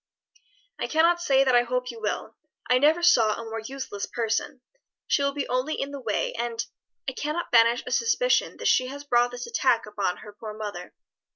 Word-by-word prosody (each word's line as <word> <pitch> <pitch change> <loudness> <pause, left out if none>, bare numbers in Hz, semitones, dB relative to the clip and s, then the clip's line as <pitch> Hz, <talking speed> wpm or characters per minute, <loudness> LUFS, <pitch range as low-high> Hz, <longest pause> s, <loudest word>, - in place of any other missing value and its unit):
"I - - -2
cannot 335 +2 +3
say 270 -5 +4
that 260 -2 +2
I 245 - +6
hope 250 +1 -2
you 230 -1 -11
will. 210 - -3 0.3
I 250 0 +4
never 310 +5 +3
saw 225 -11 +4
a 230 - -6
more 225 0 -5
useless 225 -3 -6
person; 230 +2 -2 0.4
she - - +1
will 280 0 +1
be 285 - -2
only 255 +5 -1
in 275 - -3
the 280 - -6
way; 220 -4 -1
and 235 0 -2 0.4
I - - 0
cannot 300 +6 -4
banish 235 +1 +5
a 250 - -6
suspicion 460 - +1
that - - -2
she 255 - +3
has 285 +2 -7
brought 245 -3 +3
this 245 0 -7
attack 465 - +1
upon 200 -4 -2
her 210 - -12
poor 210 0 -8
mother. 215 -1 -7
250 Hz, 200 wpm, -26 LUFS, 225-285 Hz, 0.4 s, I